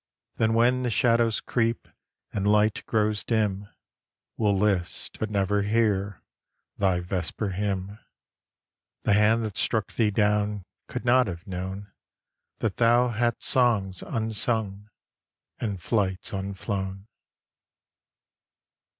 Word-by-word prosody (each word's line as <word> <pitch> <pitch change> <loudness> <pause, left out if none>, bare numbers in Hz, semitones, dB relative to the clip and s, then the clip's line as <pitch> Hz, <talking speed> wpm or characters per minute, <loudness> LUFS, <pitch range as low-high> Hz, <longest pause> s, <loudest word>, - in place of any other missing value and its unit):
Then 110 0 +2
when 125 +2 +3
the 125 - 0
shadows 115 0 +2
creep, 115 -1 -1 0.5
And 100 0 +1
light 105 0 +2
grows 105 -1 +1
dim, 105 -3 -1 0.7
We'll 105 -3 +1
list, 95 -3 -1
but 110 - -2
never 100 0 +1
hear, 100 -2 0 0.6
Thy 95 -3 +2
vesper 90 +3 -3
hymn. 100 +1 -3 1.0
The - - +3
hand 110 +2 +4
that 105 -4 -6
struck 110 -3 0
thee 110 -3 +2
down 105 -1 +1 0.2
Could - - -5
not 125 0 +4
have 85 -1 -6
known 95 +1 -6 0.7
That 105 -4 -1
thou 120 +1 +4
hadst 120 0 -1
songs 110 -7 +2
unsung 110 -2 -2 0.7
And 100 -5 -3
flights 95 -1 -1
unflown. 95 0 -4
105 Hz, 110 wpm, -26 LUFS, 95-115 Hz, 1.0 s, hand